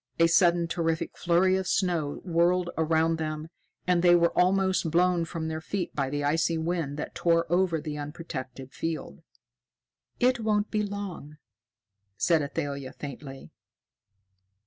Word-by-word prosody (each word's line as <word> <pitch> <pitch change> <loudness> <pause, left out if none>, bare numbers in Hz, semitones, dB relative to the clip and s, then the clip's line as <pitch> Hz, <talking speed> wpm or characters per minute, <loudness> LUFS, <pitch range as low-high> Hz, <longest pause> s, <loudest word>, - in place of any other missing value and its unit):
A 165 - +5
sudden 170 0 +4
terrific 165 -1 -2
flurry 180 +2 +3
of 190 - -3
snow 170 -6 0
whirled 175 +1 +2
around 160 0 +2
them, 155 0 -4 0.4
and 180 -1 +2
they 175 0 +6
were 170 -1 +2
almost 190 -1 +2
blown 175 +1 +2
from 165 -1 -4
their 160 0 -4
feet 180 +1 -3
by 140 -2 0
the 145 +1 -2
icy 165 +3 +1
wind 160 -3 -2
that 150 - -5
tore 165 -1 +2
over 175 -3 +2
the 150 -1 -5
unprotected 145 -4 -7
field. 165 -1 -4 1.0
"It 250 0 +3
won't 215 -1 0
be 215 - +1
long," 200 -7 -6 0.8
said 165 -3 +3
Athalia 140 -2 -4
faintly. 140 -1 -9
165 Hz, 140 wpm, -27 LUFS, 155-180 Hz, 1.0 s, they